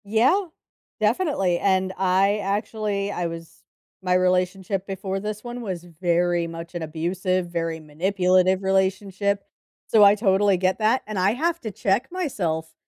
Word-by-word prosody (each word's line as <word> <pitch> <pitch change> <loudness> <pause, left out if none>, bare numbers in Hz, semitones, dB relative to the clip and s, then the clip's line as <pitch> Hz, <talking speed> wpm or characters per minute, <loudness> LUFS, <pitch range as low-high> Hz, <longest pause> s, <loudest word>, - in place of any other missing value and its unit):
Yeah, 250 - +3 0.5
definitely, 210 - +1
and 190 -1 +1
I, 190 +2 +2
actually 205 0 -2
I 175 -3 -2
was 165 -1 -9 0.4
my 180 -1 0
relationship 185 +1 0
before 195 0 -3
this 210 +1 -5
one 240 0 -6
was 185 -6 -5
very 175 0 0
much 165 +1 -8
an 175 - -4
abusive, 175 +3 -2
very 165 -1 -2
manipulative 185 +4 +1
relationship, 195 +1 0 0.4
so 215 -2 +5
I 200 0 +7
totally 200 -2 +3
get 185 +3 0
that, 220 +4 +2
and 215 -2 -4
I 190 +3 +3
have 330 +6 -1
to 220 - -5
check 205 +6 0
myself 170 - -2
190 Hz, 145 wpm, -24 LUFS, 180-205 Hz, 0.5 s, I